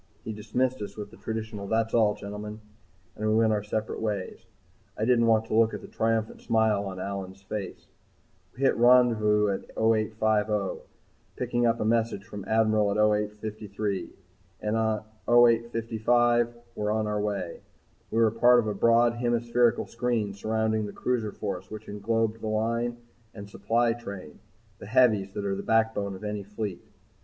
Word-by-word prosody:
He 110 - -5
dismissed 125 +4 -1
us 105 - -7
with 105 -1 -7
the 115 - -14
traditional 110 -2 -5
"That's 115 +1 0
all, 110 -3 +3
gentlemen," 105 +1 -7 0.6
and 110 0 -1
we 110 - +3
went 110 -1 +3
out 105 -1 -2
separate 110 +1 -3
ways. 105 -4 -4 0.5
I 110 - 0
didn't 115 -1 +3
want 110 -1 +3
to - - -6
look 115 0 +3
at - - -7
the - - -10
triumphant 110 -1 -1
smile 110 -3 +2
on 95 -1 -6
Allyn's 95 0 -6
face. 100 -1 -6 0.7
We 135 - -5
hit 135 - +4
rendezvous 115 -4 +4
at 95 - -4
0850, 110 -2 +1 0.5
picked 125 -1 -5
up 115 0 +1
a - - -1
message 115 -3 +1
from 100 +1 -8
the - - -10
Admiral 110 -2 +3
at 100 - -1
0853, 105 -1 -1 0.5
and 105 +1 -1
at 110 -1 0 0.3
0855 120 0 +3 0.2
were 105 0 -2
on 110 0 0
our 105 0 -1
way. 100 -5 -3 0.5
We 115 - 0
were 110 -1 +4
part 120 +2 +5
of 120 - +2
a 105 - -1
broad 115 +3 +4
hemispherical 120 0 +1
screen 115 -4 -1
surrounding 110 +1 -1
the 100 - -8
Cruiser 115 -4 -1
Force 95 -3 -5
which 110 0 -8
englobed 110 +2 -1
the 110 - -4
Line 115 +2 -1 0.4
and 100 -2 -8
supply 115 +4 +1
train 100 -9 -9 0.4
the - - -9
heavies 110 -5 +3
that 100 - -3
are 100 - 0
the 100 - -4
backbone 110 -3 +1
of 95 - -11
any 105 -1 -3
fleet. 105 -2 -5
110 Hz, 165 wpm, -27 LUFS, 105-115 Hz, 0.7 s, part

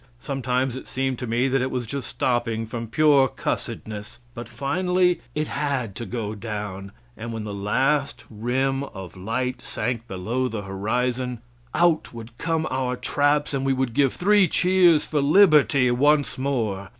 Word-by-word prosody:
Sometimes 130 -2 -1
it 130 - -8
seemed 130 -1 -2
to 125 - -4
me 120 +3 +1
that 135 0 +1
it 130 - 0
was 125 -2 -3
just 140 +3 -5
stopping 120 -2 -1
from 115 +1 -5
pure 140 +2 +4
cussedness; 110 -2 -5 0.2
but 120 0 -8
finally 180 +8 +1 0.2
it 155 0 -1
had 140 -7 -2
to 120 - -5
go 110 -3 -3
down, 105 -3 -6 0.2
and 115 +1 -6
when 110 -1 -4
the 105 -1 -5
last 135 +8 0
rim 130 +5 -1
of 95 -9 -9
light 125 +7 -3
sank 120 -2 -3
below 115 +8 -2
the 110 -4 -5
horizon, 120 +6 -2 0.4
out 170 -7 +2
would 115 0 -9
come 165 -1 0
our 130 -1 -1
traps, 145 +3 +1
and 135 -1 -1
we 135 0 +2
would 130 -3 -1
give 135 +1 +3
three 200 0 +4
cheers 180 -2 +4
for 150 -2 0
liberty 145 -5 +5
once 145 +3 +3
more. 115 -8 -2
130 Hz, 160 wpm, -24 LUFS, 115-140 Hz, 0.4 s, liberty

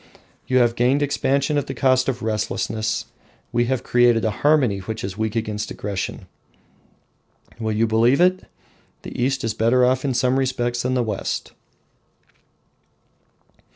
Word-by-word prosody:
You 130 - +2
have 120 -2 +4
gained 130 +5 +2
expansion 140 +1 +1
at 140 - -5
the - - -5
cost 130 -1 +2
of 125 -4 -4
restlessness; 110 +1 -2 0.5
we 120 0 +1
have 130 0 -1
created 120 -2 +3
a 110 - +1
harmony 140 -9 +3
which 110 +3 -6
is 95 -1 -4
weak 110 0 -2
against 110 -2 -3
aggression. 100 -2 -5 1.3
Will 110 -1 -2
you 110 +2 +2
believe 115 +5 +3
it? 185 +1 +3 0.6
the - - -8
East 135 +1 0
is 115 -1 -1
better 120 +3 +3
off 130 +1 +1
in 135 -3 -1
some 125 +1 +2
respects 120 -2 -1
than 125 +1 -1
the 125 - +1
West! 105 -3 -3
120 Hz, 150 wpm, -22 LUFS, 110-130 Hz, 1.3 s, have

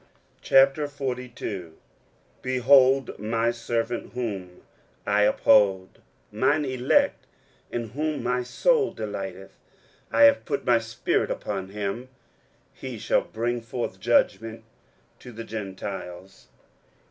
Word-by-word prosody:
23:042:001 130 - 0 0.7
Behold 130 +1 +4
my 115 +2 0
servant, 120 0 -3
whom 95 -8 -5 0.4
I 105 0 +2
uphold; 100 -3 +3 0.3
mine 130 +7 +1
elect, 130 - +1 0.4
in 120 -2 -3
whom 150 +3 -3
my 125 +1 0
soul 430 - +1
delighteth; - - -6 0.5
I - - +4
have 285 -1 +6
put 140 -4 -3
my 120 -2 +4
spirit 115 0 -1
upon 95 -2 -4
him: 105 +5 -4 0.6
he 130 -3 -7
shall 110 - +1
bring 120 +2 -3
forth 115 +1 -5
judgment 110 +3 +1 0.6
to 125 - -11
the 115 0 -7
Gentiles. 95 -3 -7
120 Hz, 100 wpm, -25 LUFS, 105-130 Hz, 0.7 s, have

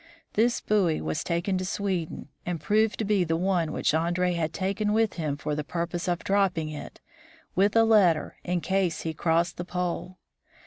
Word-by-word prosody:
This 235 +3 +2
buoy 195 -7 +2
was 80 0 -2
taken 175 +3 0
to - - -2
Sweden, 185 -5 -3
and 175 -2 -3
proved 210 +4 +2
to 220 - -1
be 200 -2 +2
the 165 -1 0
one 175 -3 +1
which - - 0
Andree 175 +3 +1
had 165 -2 -1
taken 200 +4 -1
with 225 -1 +2
him 150 -4 -2
for 150 0 -3
the 150 0 -2
purpose 170 +3 -3
of 175 -1 -1
dropping 190 -6 +1
it, 150 - -8 0.5
with 200 +3 +2
a 225 - +6
letter, 200 -8 +3
in 175 -1 -1
case 190 -4 0
he 160 - -3
crossed 170 +2 +1
the 175 - -3
pole. 180 0 -3
180 Hz, 185 wpm, -27 LUFS, 165-195 Hz, 0.5 s, a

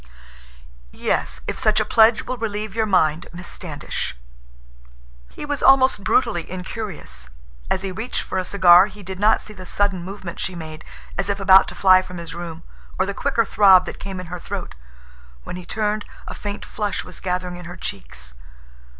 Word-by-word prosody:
"Yes, 65 0 -1
if - - -3
such 215 -1 +3
a 215 - +1
pledge 225 0 +5
will 255 - -4
relieve 215 -2 -3
your 220 -1 0
mind, 160 -5 +2
Miss 175 0 -7
Standish." - - -4 1.1
He - - -8
was 290 -1 -2
almost 260 -6 +5
brutally 210 -10 +1
incurious. 180 - -6 0.4
As 190 - 0
he 195 - -2
reached 220 +7 -3
for 190 - -2
a - - -1
cigar, 180 -1 +6
he 205 0 -12
did 190 0 -7
not 215 +2 +3
see 215 - -9
the 185 -2 -10
sudden 195 0 0
movement 185 -2 -7
she 185 - -2
made, 155 -2 -8 0.4
as 195 - 0
if 200 0 0
about 190 0 +7
to - - -8
fly 185 -1 +6
from 180 -1 -9
his 170 -1 -7
room, 170 -1 -7 0.3
or 190 - +2
the 200 - -3
quicker 230 +3 +1
throb 190 -3 +6
that - - -7
came 195 -1 -6
in 185 - -6
her 180 - -4
throat. - - -6 0.7
When - - -7
he 180 -1 -9
turned, 210 0 -1 0.2
a - - -5
faint 205 0 -6
flush 205 -2 -3
was 180 - -8
gathering 180 -1 -3
in 180 - -10
her 175 +1 -8
cheeks. - - -7
190 Hz, 185 wpm, -22 LUFS, 175-210 Hz, 1.1 s, about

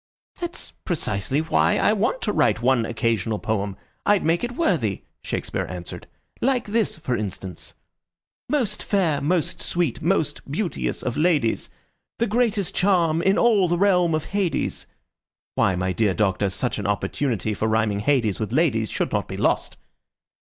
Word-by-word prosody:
"That's 350 0 -5
precisely 130 - -1
why 160 - +2
I 210 - +3
want 220 +4 0
to 210 - +1
write 115 - +2
one 120 -3 +3
occasional 115 -2 0
poem. 100 -3 -2 0.3
I'd 205 -1 +3
make 165 +5 +2
it 240 0 -2
worthy," 160 - 0 0.2
Shakespeare - - -3
answered. 90 -1 -7 0.3
"Like 255 -1 +2
this, 215 -3 0
for 130 -6 -2
instance: 95 -4 -6 0.7
Most 240 -9 0
fair, 175 -8 +1
most 165 +1 0
sweet, 170 -8 -1
most 165 -2 0
beauteous 175 +5 -2
of 120 - -2
ladies, 155 -8 +1 0.5
The 235 - +2
greatest 220 -4 0
charm 170 -4 +2
in 190 +3 +3
all 210 -7 +4
ye 175 - +2
realm 180 -4 +3
of 155 - -2
Hades. 195 -4 -1 0.7
Why, 95 - +2
my 90 +1 -1
dear 105 -3 +1
Doctor, 100 -1 +1
such 110 +5 -2
an 100 - -2
opportunity 110 +1 -1
for 110 +2 -1
rhyming 110 -2 +1
Hades 115 -4 +1
with 110 -1 -3
ladies 120 - +2
should - - -2
not - - -1
be - - -6
lost." - - 0
150 Hz, 155 wpm, -23 LUFS, -, 0.7 s, all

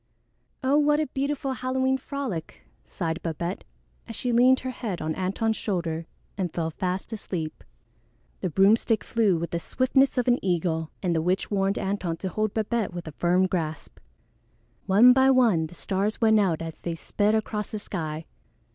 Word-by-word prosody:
"Oh, 275 +3 +4
what 295 0 +3
a 310 - +1
beautiful 275 0 -2
Halloween 260 +1 0
frolic," 255 - -5 0.2
sighed 165 0 -3
Babette 170 +3 -3 0.4
as 230 - -7
she 245 - -1
leaned 250 +2 +5
her 260 - -3
head 220 -7 -4
on 155 0 -2
Antone's 200 +5 -1
shoulder 170 -5 -2 0.3
and 180 -3 -1
fell 165 -1 -2
fast 185 +6 -3
asleep. 175 -7 -5 0.8
The 185 - -2
broomstick 210 +5 +3
flew 215 -6 +2
with 170 +1 -4
the 170 - -1
swiftness 260 +7 +2
of 250 - +1
an 245 0 +2
eagle, 165 -3 0
and 175 -2 +1
the 160 - +2
witch 180 +5 0
warned 195 0 +1
Antone 190 -4 -2
to 190 - -4
hold 215 +3 -1
Babette 220 -3 -1
with 175 -2 -6
a - - -5
firm 180 +2 +3
grasp. 160 -4 -4 0.9
One 220 +6 +7
by 265 +1 +5
one 230 -12 +4
the 175 - -14
stars 200 +4 -1
went 220 -2 +5
out 175 -5 +1
as 165 -1 -7
they 170 -1 -4
sped 205 +5 0
across 210 -1 -2
the 215 - -4
sky. 160 -6 -4
195 Hz, 175 wpm, -26 LUFS, 170-240 Hz, 0.9 s, One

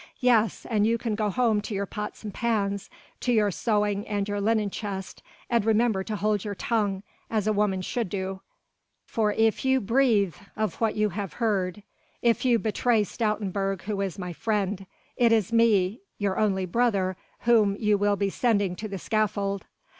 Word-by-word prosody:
"Yes, 230 -5 +2
and 215 -2 +2
you 230 +1 +2
can 230 -1 -2
go 210 0 0
home 220 -1 +2
to 210 0 -5
your 200 +1 -1
pots 210 +3 -6
and 210 -2 -6
pans, 200 -4 -1 0.3
to 250 - 0
your 210 -3 +3
sewing 205 0 0
and 205 -1 -1
your 205 0 -2
linen 215 -1 +1
chest, 195 -2 -5 0.3
and 235 -3 +2
remember 220 -2 +2
to 215 - -3
hold 210 -1 0
your 205 -1 -4
tongue, 205 -3 -1 0.3
as 215 -3 0
a 215 - +2
woman 200 -3 +1
should 230 0 -2
do, 190 0 -4 0.6
for 215 -2 0
if 225 0 +2
you 265 0 +3
breathe 225 - +2 0.2
of 215 +1 -2
what 225 -2 +1
you 215 0 +2
have 195 0 -5
heard, 205 -4 -1 0.4
if 235 -1 +3
you 245 -2 +4
betray 225 0 +1
Stoutenburg 200 -3 -2
who 200 0 -2
is 195 -4 -3
my 180 -2 -5
friend, 200 -1 -1 0.3
it 235 -2 +4
is 225 -1 +2
me 220 -2 +3 0.2
your 200 -2 -1
only 195 -3 +1
brother 195 -2 +1 0.3
whom 220 -4 +4
you 210 -1 +3
will 205 0 +2
be 200 -1 -1
sending 205 -7 +1
to 215 - -5
the 200 -2 -5
scaffold." 200 -1 -1
210 Hz, 180 wpm, -26 LUFS, 195-225 Hz, 0.6 s, you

